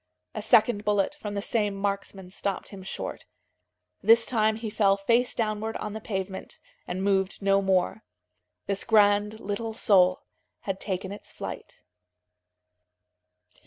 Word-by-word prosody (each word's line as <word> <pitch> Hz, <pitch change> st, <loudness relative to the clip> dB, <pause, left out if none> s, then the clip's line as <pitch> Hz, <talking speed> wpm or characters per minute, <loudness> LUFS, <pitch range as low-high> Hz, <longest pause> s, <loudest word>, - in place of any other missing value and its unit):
A -, -, -4 dB
second 210 Hz, -4 st, +4 dB
bullet 205 Hz, +2 st, +1 dB
from 215 Hz, -9 st, -6 dB
the 200 Hz, -, -2 dB
same 210 Hz, -4 st, 0 dB
marksman 195 Hz, -2 st, -4 dB
stopped 195 Hz, 0 st, -3 dB
him 195 Hz, -2 st, -10 dB
short. 185 Hz, -, -6 dB, 0.7 s
This 230 Hz, 0 st, +5 dB
time 220 Hz, -3 st, +2 dB
he 220 Hz, -1 st, -5 dB
fell 200 Hz, -2 st, +3 dB
face 235 Hz, +5 st, +1 dB
downward 220 Hz, 0 st, -1 dB
on 210 Hz, -, -5 dB
the 220 Hz, -, -6 dB
pavement, 190 Hz, -2 st, -5 dB, 0.3 s
and 185 Hz, +1 st, -3 dB
moved 195 Hz, 0 st, 0 dB
no 195 Hz, 0 st, +4 dB
more. 185 Hz, -, +1 dB, 0.6 s
This 200 Hz, 0 st, -2 dB
grand 210 Hz, -1 st, +3 dB
little 220 Hz, +2 st, -4 dB
soul 185 Hz, -4 st, +4 dB, 0.4 s
had 195 Hz, -1 st, -3 dB
taken 190 Hz, -1 st, -3 dB
its 205 Hz, -, -10 dB
flight. -, -, -8 dB
205 Hz, 135 wpm, -27 LUFS, 195-220 Hz, 0.7 s, This